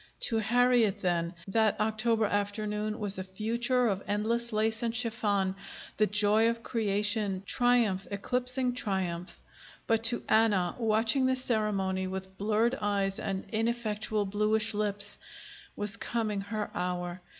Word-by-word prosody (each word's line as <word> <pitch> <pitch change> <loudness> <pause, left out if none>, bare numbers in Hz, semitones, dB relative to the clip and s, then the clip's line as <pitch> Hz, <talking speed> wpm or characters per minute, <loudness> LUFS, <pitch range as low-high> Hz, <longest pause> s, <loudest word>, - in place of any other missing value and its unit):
To 225 - +1
Harriet, 235 -2 +2
then, 170 -1 0
that 215 +1 +2
October 220 +1 +1
afternoon 210 +1 -2
was 205 -3 -2
a - - -3
future 235 +6 0
of 195 -2 -1
endless 230 +3 0
lace 220 +1 0
and 230 -1 -1
chiffon, 205 -5 0 0.4
the 215 - +3
joy 210 +2 +3
of 230 0 -4
creation, 205 -3 0
triumph 235 -6 +2
eclipsing 250 +5 -1
triumph. 190 -6 -3 0.5
But 225 0 +1
to 235 +1 +4
Anna, 205 -5 +3
watching 225 +4 +2
the 260 - +2
ceremony 210 -6 -1
with 190 0 -6
blurred 220 +4 +2
eyes 200 -1 0
and 195 -1 -3
ineffectual 220 -2 -1
bluish 215 +2 +2
lips, 205 -1 -2 0.6
was 205 -1 +1
coming 215 -4 -2
her 210 +1 -4
hour. 180 0 -3
215 Hz, 130 wpm, -29 LUFS, 195-230 Hz, 0.6 s, to